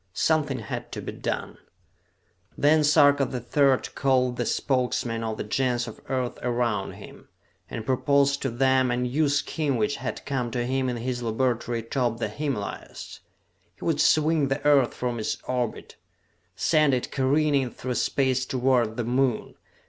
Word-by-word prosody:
Something 150 Hz, -, +1 dB
had 115 Hz, -, -6 dB
to -, -, -4 dB
be -, -, -5 dB
done. -, -, -4 dB, 1.0 s
Then 150 Hz, +1 st, +4 dB
Sarka 145 Hz, -2 st, +5 dB
the 130 Hz, -1 st, -3 dB
Third 135 Hz, +2 st, +1 dB
called 130 Hz, -2 st, +1 dB
the 120 Hz, -, -1 dB
Spokesmen 125 Hz, -3 st, 0 dB
of 110 Hz, -1 st, -3 dB
the -, -, -3 dB
Gens 120 Hz, +2 st, 0 dB
of 115 Hz, -, -9 dB
Earth 130 Hz, -2 st, -2 dB
around 120 Hz, -5 st, -1 dB
him, -, -, -13 dB, 0.4 s
and 110 Hz, -, -6 dB
proposed 140 Hz, +2 st, +2 dB
to 135 Hz, -, -1 dB
them 130 Hz, +1 st, +2 dB
a 120 Hz, -, 0 dB
new 130 Hz, +5 st, +1 dB
scheme 145 Hz, 0 st, 0 dB
which 110 Hz, +6 st, 0 dB
had -, -, -5 dB
come 130 Hz, -4 st, -2 dB
to 120 Hz, +1 st, -2 dB
him 130 Hz, +1 st, 0 dB
in 120 Hz, -, -2 dB
his 120 Hz, +1 st, -3 dB
laboratory 120 Hz, 0 st, -1 dB
atop 120 Hz, 0 st, -1 dB
the 110 Hz, -2 st, -2 dB
Himalayas. 135 Hz, -3 st, -5 dB, 0.6 s
He -, -, -10 dB
would -, -, +1 dB
swing 155 Hz, -1 st, +3 dB
the 135 Hz, +2 st, -3 dB
Earth 140 Hz, -4 st, +4 dB
from 120 Hz, -2 st, -3 dB
its 110 Hz, -, -2 dB
orbit! 125 Hz, -3 st, -3 dB, 0.6 s
send 150 Hz, -, +3 dB
it 125 Hz, -, -4 dB
careening 140 Hz, 0 st, +2 dB
through 125 Hz, +1 st, -5 dB
space 130 Hz, 0 st, +1 dB
toward 125 Hz, -4 st, +1 dB
the 120 Hz, -, -1 dB
Moon! 125 Hz, 0 st, 0 dB
130 Hz, 160 wpm, -26 LUFS, 120-140 Hz, 1.0 s, Sarka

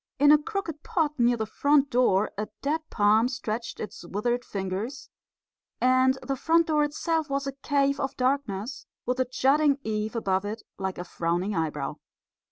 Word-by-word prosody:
In 290 Hz, +2 st, +6 dB
a 300 Hz, 0 st, +6 dB
crooked 370 Hz, -5 st, -4 dB
pot 335 Hz, -10 st, 0 dB
near 240 Hz, 0 st, +4 dB
the 220 Hz, -, -1 dB
front 285 Hz, +5 st, +2 dB
door 215 Hz, -5 st, +3 dB
a 210 Hz, +1 st, -3 dB, 0.2 s
dead 305 Hz, +3 st, 0 dB
palm 215 Hz, +2 st, +4 dB
stretched 235 Hz, -2 st, -4 dB
its 210 Hz, -, -7 dB
withered 240 Hz, +7 st, -1 dB
fingers; 200 Hz, +8 st, -4 dB, 0.7 s
and 255 Hz, +1 st, +4 dB
the 275 Hz, -, -2 dB
front 330 Hz, +5 st, +3 dB
door 305 Hz, -2 st, +2 dB
itself 310 Hz, +1 st, -1 dB
was 275 Hz, 0 st, -1 dB
a 275 Hz, -, -2 dB
cave 280 Hz, 0 st, +1 dB
of 270 Hz, -, -3 dB
darkness, 255 Hz, -3 st, -1 dB, 0.2 s
with 250 Hz, +1 st, -1 dB
a 255 Hz, -, +3 dB
jutting 280 Hz, +3 st, +3 dB
eave 215 Hz, +1 st, -2 dB
above 190 Hz, -4 st, 0 dB
it 215 Hz, +2 st, -5 dB, 0.2 s
like 190 Hz, -1 st, -3 dB
a 175 Hz, -, -4 dB
frowning 175 Hz, +3 st, -1 dB
eyebrow. 160 Hz, -4 st, -2 dB
255 Hz, 170 wpm, -27 LUFS, 210-285 Hz, 0.7 s, In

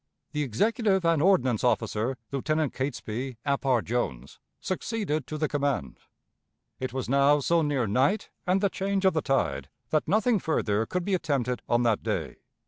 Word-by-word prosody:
The 150 Hz, -, -2 dB
executive 190 Hz, -, +1 dB
and 165 Hz, -3 st, +3 dB
ordnance 130 Hz, -, +3 dB
officer, 115 Hz, +1 st, 0 dB
Lieutenant 155 Hz, +2 st, 0 dB
Catesby 130 Hz, -2 st, -4 dB
Ap 140 Hz, -1 st, 0 dB
R. 125 Hz, -4 st, +3 dB
Jones, 105 Hz, -, -3 dB, 0.2 s
succeeded 185 Hz, -, -2 dB
to 155 Hz, -, -4 dB
the 155 Hz, 0 st, 0 dB
command. 140 Hz, -, -2 dB, 0.8 s
It 130 Hz, -, -3 dB
was 130 Hz, 0 st, -3 dB
now 140 Hz, +2 st, +4 dB
so 165 Hz, +4 st, +2 dB
near 145 Hz, -5 st, +1 dB
night 130 Hz, -, +1 dB, 0.2 s
and 185 Hz, +2 st, +2 dB
the 200 Hz, -, +3 dB
change 195 Hz, 0 st, -1 dB
of 190 Hz, -, +5 dB
the 155 Hz, -, +1 dB
tide 135 Hz, -, 0 dB, 0.2 s
that 155 Hz, -, +1 dB
nothing 215 Hz, +5 st, +3 dB
further 110 Hz, -, 0 dB
could 180 Hz, -1 st, -2 dB
be 200 Hz, -, 0 dB
attempted 140 Hz, -8 st, 0 dB
on 120 Hz, +1 st, +3 dB
that 115 Hz, -3 st, +2 dB
day. -, -, -3 dB
140 Hz, 165 wpm, -27 LUFS, 125-175 Hz, 0.8 s, of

